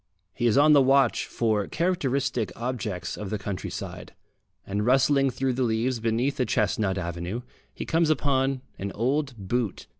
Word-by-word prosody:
He 120 Hz, -, 0 dB
is 115 Hz, -, +3 dB
on 150 Hz, +2 st, +6 dB
the 145 Hz, -, +7 dB
watch 135 Hz, -2 st, +3 dB
for 110 Hz, -4 st, 0 dB
characteristic 135 Hz, -, 0 dB
objects 115 Hz, -6 st, -4 dB
of 105 Hz, -2 st, -5 dB
the 110 Hz, -, -1 dB
countryside, 100 Hz, -2 st, -6 dB, 0.5 s
and 100 Hz, +1 st, -2 dB
rustling 135 Hz, +3 st, +4 dB
through 130 Hz, 0 st, -1 dB
the 130 Hz, -, -2 dB
leaves 120 Hz, +1 st, 0 dB
beneath 115 Hz, +5 st, 0 dB
a 125 Hz, -, +2 dB
chestnut 100 Hz, -5 st, +1 dB
avenue 85 Hz, +6 st, -4 dB, 0.3 s
he -, -, -6 dB
comes 165 Hz, -1 st, +2 dB
upon 135 Hz, -3 st, +1 dB, 0.2 s
an 100 Hz, 0 st, -3 dB
old 135 Hz, +3 st, 0 dB
boot. 105 Hz, +2 st, -2 dB
125 Hz, 155 wpm, -26 LUFS, 105-135 Hz, 0.5 s, the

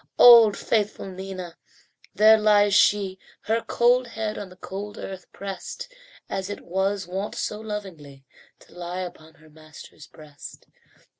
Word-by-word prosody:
Old 230 Hz, -4 st, +8 dB
faithful 215 Hz, -2 st, -1 dB
Nina! 185 Hz, -2 st, -8 dB, 0.6 s
There 220 Hz, +1 st, +6 dB
lies 205 Hz, -1 st, +4 dB
she, 195 Hz, -2 st, +3 dB, 0.2 s
Her 225 Hz, +2 st, -1 dB
cold 245 Hz, +2 st, +2 dB
head 220 Hz, -2 st, -4 dB
on 200 Hz, -2 st, -7 dB
the 185 Hz, -, -15 dB
cold 200 Hz, +3 st, -8 dB
earth 190 Hz, -2 st, -9 dB
pressed, 195 Hz, -, -8 dB, 0.3 s
As 195 Hz, 0 st, -4 dB
it 205 Hz, -, -6 dB
was 190 Hz, +2 st, -2 dB
wont 190 Hz, +4 st, -5 dB
so 210 Hz, -, -3 dB
lovingly 180 Hz, -11 st, -8 dB, 0.4 s
To -, -, -20 dB
lie 175 Hz, +1 st, -5 dB
upon 160 Hz, -3 st, -9 dB
her 155 Hz, -1 st, -20 dB
master's 155 Hz, -1 st, -14 dB
breast. 150 Hz, -2 st, -13 dB
195 Hz, 140 wpm, -24 LUFS, 175-210 Hz, 0.6 s, Old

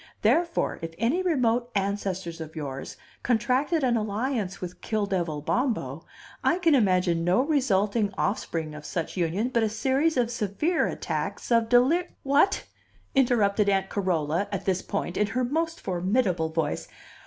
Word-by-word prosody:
Therefore 330 Hz, +10 st, +2 dB
if 165 Hz, 0 st, -6 dB
any 250 Hz, -, +1 dB
remote 250 Hz, -9 st, +1 dB
ancestors 190 Hz, -4 st, -2 dB
of 160 Hz, 0 st, -8 dB
yours 140 Hz, -4 st, -6 dB, 0.2 s
contracted 255 Hz, +7 st, +1 dB
an 245 Hz, -2 st, +3 dB
alliance 215 Hz, -2 st, -2 dB
with 180 Hz, -1 st, -7 dB
Kill 215 Hz, -2 st, -1 dB
devil 170 Hz, -6 st, -2 dB
Bombo, 165 Hz, -, -1 dB, 0.4 s
I 345 Hz, -, +3 dB
can 335 Hz, -4 st, +3 dB
imagine 185 Hz, -8 st, +3 dB
no 180 Hz, +6 st, +3 dB
resulting 215 Hz, -8 st, +1 dB
offspring 165 Hz, -6 st, -2 dB
of 150 Hz, 0 st, -9 dB
such 165 Hz, +2 st, -4 dB
union 185 Hz, +6 st, 0 dB
but 235 Hz, -2 st, +1 dB
a 220 Hz, -, +2 dB
series 270 Hz, +7 st, +1 dB
of 240 Hz, -1 st, +1 dB
severe 235 Hz, -, 0 dB
attacks -, -, -4 dB
of 230 Hz, -1 st, +3 dB
delir 270 Hz, +9 st, +4 dB
" -, -, -43 dB
"What?" 380 Hz, +8 st, +3 dB, 0.5 s
interrupted 215 Hz, -6 st, +3 dB
Aunt 195 Hz, -1 st, +1 dB
Carola, 175 Hz, -1 st, 0 dB
at 200 Hz, -, -3 dB
this 185 Hz, -1 st, +1 dB
point, 190 Hz, -2 st, -3 dB
in 210 Hz, -, +2 dB
her 250 Hz, +4 st, -1 dB
most 325 Hz, +6 st, -1 dB
formidable 185 Hz, -2 st, 0 dB
voice. 160 Hz, -2 st, -2 dB
210 Hz, 155 wpm, -26 LUFS, 180-255 Hz, 0.5 s, delir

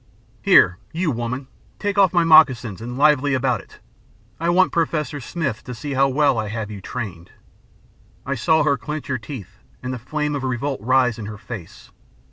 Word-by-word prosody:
Here, 90 Hz, +2 st, +5 dB
you, 165 Hz, -1 st, -1 dB
woman, 125 Hz, +2 st, -4 dB, 0.3 s
take 205 Hz, -1 st, -1 dB
off 190 Hz, -3 st, +5 dB
my 175 Hz, -2 st, +3 dB
moccasins, 125 Hz, -, +5 dB
and 120 Hz, +2 st, -6 dB
lively 145 Hz, -1 st, +3 dB
about 125 Hz, -5 st, 0 dB
it. -, -, -18 dB, 0.6 s
I 165 Hz, +1 st, 0 dB
want 185 Hz, +2 st, +4 dB
Professor 150 Hz, -4 st, -1 dB
Smith 135 Hz, -4 st, -3 dB
to 125 Hz, -, -6 dB
see 140 Hz, +5 st, -5 dB
how 135 Hz, +1 st, +3 dB
well 135 Hz, -3 st, +2 dB
I 110 Hz, -, -2 dB
have 110 Hz, 0 st, -4 dB
you 100 Hz, -2 st, -8 dB
trained.' 95 Hz, -4 st, -6 dB, 1.0 s
"I 140 Hz, -, -1 dB
saw 160 Hz, +5 st, +2 dB
her 140 Hz, -2 st, +2 dB
clench 150 Hz, -1 st, -5 dB
her 130 Hz, -2 st, -1 dB
teeth, 110 Hz, -3 st, -9 dB, 0.2 s
and 130 Hz, 0 st, -3 dB
the 125 Hz, -, -5 dB
flame 150 Hz, +4 st, -2 dB
of 140 Hz, -2 st, -3 dB
revolt 130 Hz, 0 st, -2 dB
rise 125 Hz, 0 st, +2 dB
in 105 Hz, -, -6 dB
her 105 Hz, 0 st, -7 dB
face. 100 Hz, -5 st, -10 dB
130 Hz, 185 wpm, -21 LUFS, 115-150 Hz, 1.0 s, Here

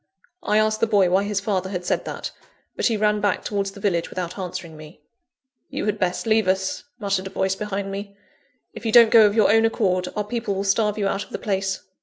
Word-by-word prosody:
I 215 Hz, -11 st, +1 dB
asked 215 Hz, 0 st, +2 dB
the 230 Hz, -, +2 dB
boy 200 Hz, -4 st, +3 dB
why 195 Hz, +2 st, +3 dB
his 205 Hz, -1 st, -1 dB
father 195 Hz, -2 st, -2 dB
had 180 Hz, -2 st, -4 dB
said -, -, -1 dB
that; -, -, -5 dB, 0.4 s
but -, -, +1 dB
he 225 Hz, -3 st, 0 dB
ran 210 Hz, 0 st, +1 dB
back 205 Hz, -2 st, 0 dB
towards 200 Hz, -1 st, -2 dB
the 200 Hz, -, -11 dB
village 180 Hz, -4 st, 0 dB
without 180 Hz, -1 st, -5 dB
answering 175 Hz, -4 st, -6 dB
me. 155 Hz, +1 st, -13 dB, 0.7 s
"You -, -, -4 dB
had 210 Hz, 0 st, -1 dB
best 180 Hz, +2 st, -1 dB
leave 220 Hz, -2 st, +2 dB
us," 190 Hz, +5 st, -1 dB
muttered 200 Hz, -4 st, -1 dB
a -, -, -6 dB
voice 190 Hz, 0 st, 0 dB
behind 195 Hz, -1 st, -4 dB
me. 200 Hz, 0 st, -7 dB, 0.6 s
"If -, -, -10 dB
you 225 Hz, -, -1 dB
don't 230 Hz, -1 st, +7 dB
go 220 Hz, -2 st, +8 dB
of 205 Hz, -, -1 dB
your 215 Hz, -3 st, +4 dB
own 225 Hz, +1 st, +5 dB
accord, 195 Hz, -5 st, +1 dB
our 210 Hz, -, -1 dB
people 215 Hz, -1 st, -3 dB
will 195 Hz, -, -2 dB
starve 210 Hz, +1 st, +1 dB
you 200 Hz, -2 st, 0 dB
out 195 Hz, -, -1 dB
of -, -, -22 dB
the -, -, -4 dB
place." 195 Hz, -2 st, -2 dB
200 Hz, 235 wpm, -23 LUFS, 190-215 Hz, 0.7 s, go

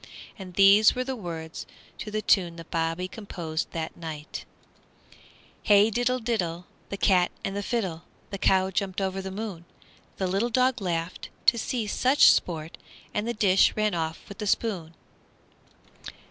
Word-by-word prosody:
And 185 Hz, -2 st, -9 dB
these 200 Hz, +3 st, +7 dB
were 255 Hz, -, -1 dB
the 265 Hz, 0 st, -4 dB
words 165 Hz, -6 st, -7 dB, 0.3 s
to -, -, -5 dB
the 215 Hz, 0 st, -3 dB
tune 175 Hz, -4 st, +3 dB
that 165 Hz, -1 st, -11 dB
Bobby 165 Hz, +2 st, -1 dB
composed 170 Hz, -6 st, -5 dB
that 160 Hz, -1 st, -5 dB
night: 155 Hz, -2 st, -7 dB, 1.2 s
Hey, 205 Hz, +1 st, +5 dB
diddle, 245 Hz, +3 st, +1 dB
diddle, 180 Hz, -8 st, -2 dB, 0.2 s
The 200 Hz, -, -4 dB
cat 185 Hz, -2 st, +3 dB, 0.2 s
and 195 Hz, -, -3 dB
the 205 Hz, -, -2 dB
fiddle, 190 Hz, -7 st, -2 dB, 0.3 s
The 200 Hz, -, -5 dB
cow 190 Hz, 0 st, +3 dB
jumped 190 Hz, 0 st, -2 dB
over 195 Hz, 0 st, -2 dB
the 190 Hz, -, -5 dB
moon! 195 Hz, -3 st, -6 dB, 0.5 s
The 190 Hz, -, -1 dB
little 195 Hz, +6 st, 0 dB
dog 255 Hz, 0 st, +2 dB
laughed 170 Hz, -1 st, -3 dB, 0.2 s
To 235 Hz, -, +5 dB
see 230 Hz, 0 st, -2 dB
such 260 Hz, +6 st, +5 dB
sport, 160 Hz, -2 st, -2 dB, 0.3 s
And 210 Hz, +2 st, -1 dB
the 235 Hz, -, -1 dB
dish 195 Hz, -3 st, +4 dB
ran 215 Hz, -1 st, +1 dB
away 160 Hz, -1 st, -2 dB
with 200 Hz, -, -11 dB
the 210 Hz, -, -3 dB
spoon! 180 Hz, -7 st, -1 dB
195 Hz, 160 wpm, -26 LUFS, 170-215 Hz, 1.2 s, these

